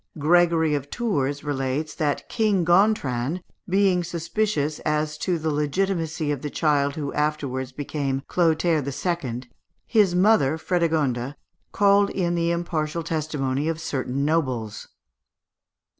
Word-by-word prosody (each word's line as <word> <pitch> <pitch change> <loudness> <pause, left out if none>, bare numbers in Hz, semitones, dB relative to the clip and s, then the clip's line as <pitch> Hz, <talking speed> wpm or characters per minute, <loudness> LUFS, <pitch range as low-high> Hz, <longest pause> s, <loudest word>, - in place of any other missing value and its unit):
Gregory 165 0 +3
of 145 -1 -2
Tours 145 - -1
relates, 145 +1 -2
that 145 -2 -1
King 210 -6 +1
Gontran 175 - +2 0.3
being 190 -1 +3
suspicious 170 -2 -1
as 150 0 -1
to 180 -2 0
the 160 0 -1
legitimacy 160 +1 -1
of 140 -3 -3
the 150 - -4
child 145 -2 +1
who 145 -3 -4
afterwards 140 -4 -1
became 135 -1 -3
Clotaire 165 -2 +2
II., 140 -3 -3 0.4
his 205 -6 +3
mother, 180 -7 +4
Frédégonde, 155 -7 0 0.4
called 200 0 +4
in 175 -3 -1
the 170 -1 +1
impartial 170 -1 -2
testimony 150 -3 -2
of 165 -1 -1
certain 140 -3 -2
nobles. 130 -9 -1
155 Hz, 120 wpm, -24 LUFS, 140-175 Hz, 0.4 s, mother